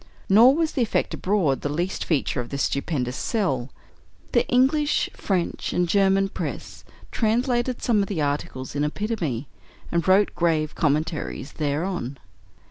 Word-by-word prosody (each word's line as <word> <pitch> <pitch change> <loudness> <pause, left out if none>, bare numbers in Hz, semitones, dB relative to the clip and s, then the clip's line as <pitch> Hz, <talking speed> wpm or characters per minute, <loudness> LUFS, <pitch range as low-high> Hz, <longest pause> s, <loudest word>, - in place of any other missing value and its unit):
Nor 235 +7 +7
was 320 -1 +1
the 260 - -1
effect 230 - 0
abroad 180 -9 +1
the 145 - -2
least 175 +6 -2
feature 140 -5 0
of 120 - -8
this 140 0 -2
stupendous 140 -4 -1
"sell." 140 - -1 0.6
The - - +2
English, 285 +4 +2
French, 185 -4 -2
and 175 0 +1
German 195 +1 +3
press - - -6 0.3
translated 240 +2 0
some 220 -4 +3
of 200 - -1
the 190 -5 -3
articles 145 -3 -2
in 145 - 0
epitome, 155 - -2 0.4
and 170 0 0
wrote 195 +2 +4
grave 160 -3 +1
commentaries 150 -2 -1
thereon. 150 -2 -2
175 Hz, 140 wpm, -24 LUFS, 145-215 Hz, 0.6 s, Nor